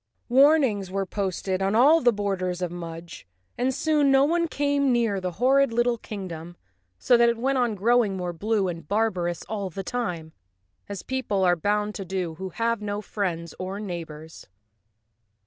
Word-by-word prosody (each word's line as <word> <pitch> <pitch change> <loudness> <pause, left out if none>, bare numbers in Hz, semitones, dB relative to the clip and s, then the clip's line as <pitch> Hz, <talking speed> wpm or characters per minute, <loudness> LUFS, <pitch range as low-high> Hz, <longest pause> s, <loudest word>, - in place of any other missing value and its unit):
Warnings 260 -7 +4
were 195 +1 -2
posted 190 -1 -2
on 195 +2 +1
all 295 +8 +6
the 245 - +5
borders 185 -4 -2
of 175 - -2
Mudge 170 - -8 0.3
and 255 +2 0
soon 295 +1 +2
no 270 0 +5
one 335 +2 +1
came 285 -2 +1
near 230 -5 +1
the 180 -1 -3
horrid 265 +5 +3
little 240 0 +1
kingdom, 175 -5 -7 0.4
so 245 - +3
that 235 0 +5
it 235 - -1
went 265 +3 0
on 240 -3 +1
growing 215 -1 +2
more 180 -1 -3
blue 205 +3 0
and 165 -4 -6
barbarous 185 -5 -1
all 200 -3 -3
the 195 +3 -6
time, 175 -9 -4 0.6
as 200 -3 -6
people 255 -7 -1
are 180 -1 +4
bound 210 +4 -1
to 200 - -5
do 185 -2 -3
who 190 +4 -6
have 230 +4 -1
no 205 0 -3
friends 175 -6 -3
or 190 +2 -4
neighbors. 160 -5 -8
205 Hz, 170 wpm, -25 LUFS, 180-240 Hz, 0.6 s, all